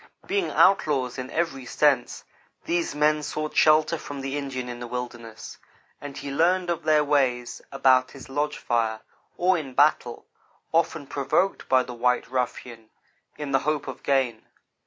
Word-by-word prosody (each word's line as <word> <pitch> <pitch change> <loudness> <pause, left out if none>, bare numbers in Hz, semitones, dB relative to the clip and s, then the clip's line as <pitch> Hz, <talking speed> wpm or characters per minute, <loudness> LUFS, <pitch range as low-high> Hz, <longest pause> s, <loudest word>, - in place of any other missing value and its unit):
Being 400 -2 0
outlaws 140 -9 +3
in 130 0 -5
every 145 -7 -2
sense, 140 -4 +1 0.4
these 170 -3 -1
men 150 +1 +2
sought 155 +1 -4
shelter 155 +1 +4
from 140 -2 -7
the 135 +1 -3
Indian 135 -3 -4
in 120 0 -6
the 120 - -6
wilderness; 120 -2 -7 0.4
and 145 -1 -8
he 140 - -6
learned 175 +4 +2
of 170 - -2
their 155 -1 +4
ways 130 -4 0
about 130 -1 +3
his 135 -2 -12
lodge 145 +3 -2
fire, 110 -2 -1 0.4
or 185 0 +3
in 135 -4 -8
battle, 145 -5 +2 0.5
often 160 -2 +1
provoked 145 +8 -1
by 130 -1 +4
the 125 - -8
white 125 +1 +1
ruffian 120 -3 -4 0.5
in 145 -2 -5
the 135 - +3
hope 150 +1 -2
of 130 - -7
gain. 135 -4 0
140 Hz, 155 wpm, -25 LUFS, 125-155 Hz, 0.5 s, shelter